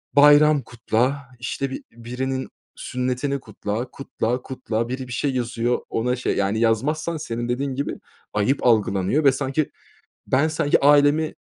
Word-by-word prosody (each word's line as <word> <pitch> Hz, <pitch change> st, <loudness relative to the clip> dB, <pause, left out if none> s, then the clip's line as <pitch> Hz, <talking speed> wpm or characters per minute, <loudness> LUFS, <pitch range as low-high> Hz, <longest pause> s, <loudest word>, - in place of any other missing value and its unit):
Bayram 145 Hz, 0 st, +7 dB
kutla, 125 Hz, +4 st, -1 dB
işte, 130 Hz, +3 st, -3 dB
bi -, -, -6 dB
birinin 130 Hz, +3 st, -4 dB, 0.3 s
sünnetini 125 Hz, +2 st, -2 dB
kutla, 110 Hz, +1 st, -5 dB
kutla, 125 Hz, -2 st, -3 dB
kutla... 115 Hz, -3 st, -3 dB
Biri 130 Hz, 0 st, -4 dB
bir 120 Hz, -, -6 dB
şey 140 Hz, +2 st, 0 dB
yazıyor, 120 Hz, 0 st, 0 dB
ona 125 Hz, +2 st, 0 dB
şey 125 Hz, -, -1 dB
Yani 100 Hz, +3 st, 0 dB
yazmazsan 150 Hz, +9 st, +1 dB
senin 120 Hz, -5 st, -4 dB
dediğin 135 Hz, +2 st, -1 dB
gibi 140 Hz, -, -3 dB, 0.3 s
ayıp 105 Hz, +8 st, +1 dB
algılanıyor 105 Hz, +4 st, +2 dB
ve 135 Hz, -, +7 dB
sanki 135 Hz, +2 st, -1 dB, 0.6 s
ben 140 Hz, +5 st, +2 dB, 0.3 s
ailemi, 145 Hz, +2 st, +4 dB
130 Hz, 135 wpm, -23 LUFS, 115-140 Hz, 0.6 s, Bayram